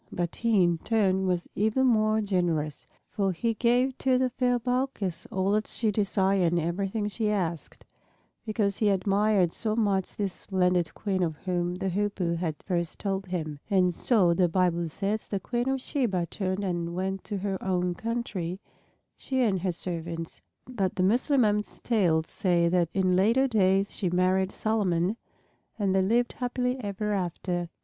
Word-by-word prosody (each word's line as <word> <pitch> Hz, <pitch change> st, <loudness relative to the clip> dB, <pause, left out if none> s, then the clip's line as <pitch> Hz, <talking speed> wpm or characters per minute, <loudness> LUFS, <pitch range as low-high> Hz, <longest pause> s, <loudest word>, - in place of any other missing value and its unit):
But 175 Hz, -1 st, -3 dB
he 225 Hz, -5 st, +3 dB
in 170 Hz, -1 st, +1 dB
turn 190 Hz, -3 st, +1 dB
was 180 Hz, -1 st, -1 dB
even 220 Hz, +6 st, +1 dB
more 215 Hz, -3 st, +3 dB
generous. 175 Hz, -7 st, -1 dB, 0.2 s
For 195 Hz, -2 st, 0 dB
he 230 Hz, +7 st, -1 dB
gave 245 Hz, +3 st, +2 dB
to 260 Hz, -1 st, +3 dB
the 255 Hz, -1 st, +1 dB
fair 245 Hz, 0 st, +1 dB
Balkis 245 Hz, -7 st, -2 dB
all 190 Hz, +1 st, 0 dB
that 215 Hz, +1 st, +1 dB
she 220 Hz, -2 st, 0 dB
desired 195 Hz, -3 st, +1 dB
and 175 Hz, -, +2 dB
everything 195 Hz, +6 st, -2 dB
she 210 Hz, +1 st, -1 dB
asked, 175 Hz, -6 st, -3 dB, 0.6 s
because 210 Hz, -3 st, 0 dB
he 215 Hz, -, +2 dB
admired 195 Hz, -1 st, +2 dB
so 215 Hz, -2 st, 0 dB
much 200 Hz, -4 st, 0 dB
this 200 Hz, -3 st, -2 dB
splendid 180 Hz, -3 st, 0 dB
Queen 195 Hz, -3 st, -1 dB
of 165 Hz, -3 st, 0 dB
whom 175 Hz, 0 st, -2 dB
the 190 Hz, +1 st, -3 dB
Hoopoe 190 Hz, -3 st, -1 dB
had 165 Hz, -2 st, -2 dB
first 170 Hz, -3 st, -2 dB
told 195 Hz, -1 st, -3 dB
him. 155 Hz, -5 st, -4 dB
And 185 Hz, -3 st, +3 dB
so, 185 Hz, -4 st, +3 dB
the 175 Hz, 0 st, +2 dB
Bible 175 Hz, -1 st, +1 dB
says, 205 Hz, +6 st, -2 dB
the 200 Hz, -, -2 dB
Queen 240 Hz, +5 st, -2 dB
of 270 Hz, 0 st, 0 dB
Sheba 230 Hz, -10 st, -1 dB
turned 190 Hz, 0 st, -2 dB
and 170 Hz, -2 st, -2 dB
went 190 Hz, +1 st, -2 dB
to 205 Hz, -, -3 dB
her 195 Hz, -1 st, -3 dB
own 180 Hz, -1 st, 0 dB
country, 195 Hz, -5 st, -3 dB, 0.6 s
she 260 Hz, -1 st, -2 dB
and 195 Hz, -6 st, +1 dB
her 185 Hz, 0 st, 0 dB
servants. 165 Hz, -1 st, -5 dB, 0.3 s
But 200 Hz, -7 st, -2 dB
the 185 Hz, -, +1 dB
Mussulmans' 215 Hz, -1 st, +2 dB
tales 175 Hz, -9 st, +2 dB
say 175 Hz, -2 st, +1 dB
that 175 Hz, -2 st, +2 dB
in 185 Hz, -1 st, +2 dB
later 230 Hz, +8 st, +3 dB
days 195 Hz, -4 st, +2 dB
she 185 Hz, -, -1 dB
married 185 Hz, +2 st, +2 dB
Solomon 195 Hz, -3 st, 0 dB, 0.6 s
and 200 Hz, -3 st, +1 dB
they 190 Hz, -, +3 dB
lived 235 Hz, +5 st, +1 dB
happily 250 Hz, 0 st, -1 dB
ever 210 Hz, +1 st, -2 dB
after. 175 Hz, -2 st, -2 dB
195 Hz, 165 wpm, -27 LUFS, 180-215 Hz, 0.6 s, he